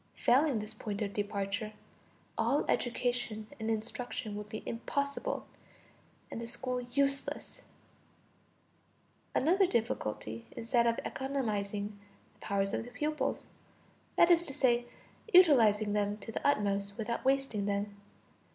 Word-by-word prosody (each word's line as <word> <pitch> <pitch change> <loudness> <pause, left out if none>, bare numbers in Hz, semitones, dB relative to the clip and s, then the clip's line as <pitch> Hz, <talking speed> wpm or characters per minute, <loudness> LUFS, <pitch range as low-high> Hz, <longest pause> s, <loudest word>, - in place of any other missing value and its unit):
Failing 270 +1 +4
this 215 0 -4
point 210 -1 -3
of 200 -1 -3
departure, 205 +1 -2 0.6
all - - +2
education 240 -3 0
and 220 0 -2
instruction 225 0 -3
would 210 0 -6
be 220 - -6
impossible, 280 - -2 0.9
and 230 - -4
the 230 - -5
school 250 +1 -2
useless. 275 +3 -1 1.7
Another 365 +7 +4
difficulty 115 - -2
is 230 - -7
that 235 -2 +5
of 230 - +2
economizing 210 -6 -2 0.3
the - - -30
powers 195 -1 0
of - - 0
the 240 - -9
pupils, 300 +4 -1 0.7
that 340 - +6
is 340 0 +6
to 275 - -3
say, 240 -4 +3 0.5
utilizing 225 - +6
them 205 0 +1
to 225 - -8
the - - -1
utmost 200 -5 +1
without 235 +1 -2
wasting 265 -6 +1
them. 200 0 -1
225 Hz, 125 wpm, -32 LUFS, 205-265 Hz, 1.7 s, that